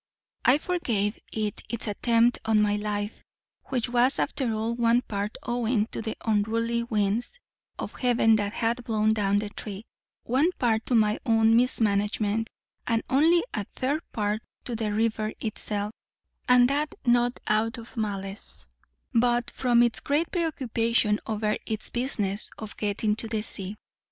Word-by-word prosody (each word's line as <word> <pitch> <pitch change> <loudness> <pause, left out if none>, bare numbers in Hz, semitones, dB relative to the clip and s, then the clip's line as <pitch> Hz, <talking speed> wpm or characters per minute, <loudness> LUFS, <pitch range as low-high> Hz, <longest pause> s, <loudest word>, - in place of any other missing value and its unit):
I 255 - +6
forgave 235 - -1
it 215 -2 -2
its 235 0 -2
attempt 230 +3 +2
on 220 -1 +3
my 210 -1 +3
life; 210 0 -3 0.4
which 255 -3 -1
was 245 +2 +3
after 255 -5 0
all 220 +1 -1
one 235 +1 +3
part 205 -1 -4
owing 240 -2 0
to - - -4
the 220 -1 -4
unruly 230 +2 +1
winds 225 - -1 0.4
of - - -5
heaven 235 -3 +3
that 205 -1 -1
had 235 +2 -1
blown 220 -1 +2
down 205 -2 +1
the 205 0 -2
tree, 205 0 -7 0.4
one 275 +9 +2
part 225 -6 0
to 250 - +2
my 215 0 +3
own 225 -2 +4
mismanagement, 215 -2 +2 0.4
and 230 -2 +1
only 325 +6 +4
a 210 - -1
third 280 +4 0
part 210 0 -1 0.2
to 240 - -3
the 220 -1 -2
river 215 0 0
itself, 210 -1 -2 0.6
and 250 -1 +7
that 290 +3 -1
not 240 0 +3
out 220 +3 +1
of 230 0 -11
malice, 200 -3 -3 0.5
but 240 0 +2
from 240 -2 +3
its 240 -2 +2
great 300 +4 0
preoccupation 235 - +1
over 215 -1 0
its 220 -1 -2
business 215 -5 -1
of 215 -1 -8
getting 210 0 0
to 225 - -2
the 220 -1 -2
sea. 195 -1 -1
225 Hz, 150 wpm, -27 LUFS, 210-240 Hz, 0.6 s, and